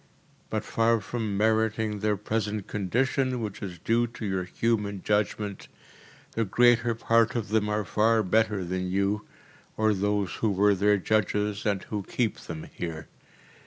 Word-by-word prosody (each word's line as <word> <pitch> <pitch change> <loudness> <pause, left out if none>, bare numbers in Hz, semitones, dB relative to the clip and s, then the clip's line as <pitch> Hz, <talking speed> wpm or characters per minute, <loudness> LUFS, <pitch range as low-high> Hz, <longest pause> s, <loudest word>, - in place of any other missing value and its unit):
But - - -2
far 115 0 +2
from 105 0 -3
meriting 110 0 +1
their 105 0 +1
present 105 0 -2
condition 125 +6 0
which 105 -4 -5
is 90 -3 -6
due 115 +7 +1
to 115 -1 -7
your 95 -2 -1
human 105 0 -1
judgment, 105 -1 -1 0.6
the 115 - 0
greater 120 +2 +3
part 115 +2 +2
of 115 -4 -2
them 105 -1 +1
are 105 0 0
far 110 +3 +3
better 105 -1 +1
than 90 +1 -2
you 100 +2 0 0.5
or 110 0 +3
those 100 -1 0
who 110 - +1
were 100 +1 +4
their 105 +2 +3
judges 105 +1 0
and 100 -2 0
who 105 -2 -4
keep 115 +3 -2
them 80 -1 -7
here. 80 -3 -6
105 Hz, 155 wpm, -27 LUFS, 100-115 Hz, 0.6 s, were